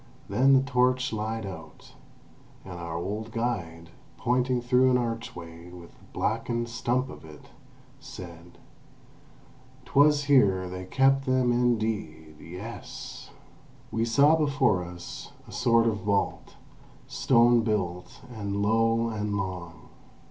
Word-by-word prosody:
Then 135 +2 +4
the 135 0 +5
torch 125 -2 +1
lied 110 0 -3
out, 90 -4 -10 0.7
and 90 -2 -8
our 85 -1 -5
old 105 +6 -4
guide, 85 -9 -3 0.3
pointing 125 +1 +1
through 125 +1 +3
an 125 - +4
archway 90 -8 -5
with 90 -1 -12
the - - -22
blackened 115 +2 -2
stump 125 +2 -1
of - - -11
it, 75 -2 -14 0.5
said: 85 -1 -11 1.3
"'Twas 145 +1 +4
here 100 -10 +3
they 90 0 -6
kept 135 +6 +2
them 130 -1 +2
indeed, 110 -11 -1
yes!" 90 +9 -9 0.6
We 115 - 0
saw 140 +7 +5
before 140 - +2
us 90 0 -9
a - - -12
sort 115 -2 +3
of 110 -2 +1
vault, 100 0 -2 0.5
stone 120 -1 +4
built, 95 -5 -3
and 100 -2 -4
low, 115 +2 +2
and 105 -2 -2
long. 90 -3 -6
110 Hz, 120 wpm, -27 LUFS, 90-125 Hz, 1.3 s, the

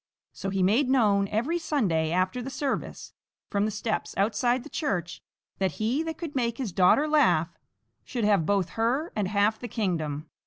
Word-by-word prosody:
So 195 - -4
he 190 -1 0
made 235 +8 +3
known 205 -7 +3
every 250 - -1
Sunday 190 - 0
after 185 +7 0
the 255 - -5
service, 270 0 -4 0.4
from 200 0 +1
the - - 0
steps 215 +1 -3
outside 240 +5 +1
the - - -10
church, 180 - -2 0.4
that 190 -1 0
he 235 +7 0
that 325 -1 -4
could 325 -5 -6
make 235 -3 0
his 250 -7 -3
daughter 190 - +4
laugh 235 - +3 0.5
should 240 -4 -4
have 205 -5 +3
both 195 -3 +1
her 250 +9 -1
and 205 -3 0
half 210 +2 +1
the 245 - -6
kingdom. 160 -9 -2
215 Hz, 180 wpm, -27 LUFS, 190-260 Hz, 0.5 s, daughter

